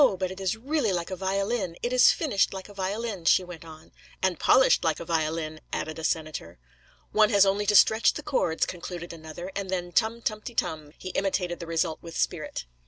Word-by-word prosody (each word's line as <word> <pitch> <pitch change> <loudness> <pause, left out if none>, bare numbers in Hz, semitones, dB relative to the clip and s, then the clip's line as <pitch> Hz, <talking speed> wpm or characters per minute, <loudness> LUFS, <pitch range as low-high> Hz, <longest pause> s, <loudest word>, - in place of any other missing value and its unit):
but 185 0 -2
it 190 +1 -8
is 190 +3 0
really 265 -2 0
like 175 0 -2
a - - -2
violin. 195 0 -1
It 240 - -1
is 250 0 +7
finished 260 - +1
like 190 - -7
a 205 - -13
violin,' 200 -1 -3
she 185 - +5
went 175 -2 -10
on. 160 -1 -13 0.3
'And 185 -3 +1
polished 260 - +5
like 160 -2 +1
a 170 - -6
violin,' 155 -1 -1
added 155 0 -3
a - - -7
senator. 155 - -3 0.5
'One 215 -1 +4
has 200 -3 +5
only 200 +1 +1
to 210 - +3
stretch 220 +3 +6
the 300 - -6
cords,' 165 - +1
concluded 175 -1 -7
another, 165 +3 -8
'and 200 -1 -3
then 175 -1 -2
tum 230 +3 +1
tumty 215 +2 -3
tum'—he 155 +3 -3
imitated 185 -2 -1
the 170 - -7
result 165 -1 -1
with 165 -1 -8
spirit. - - -2
185 Hz, 200 wpm, -27 LUFS, 165-210 Hz, 0.5 s, is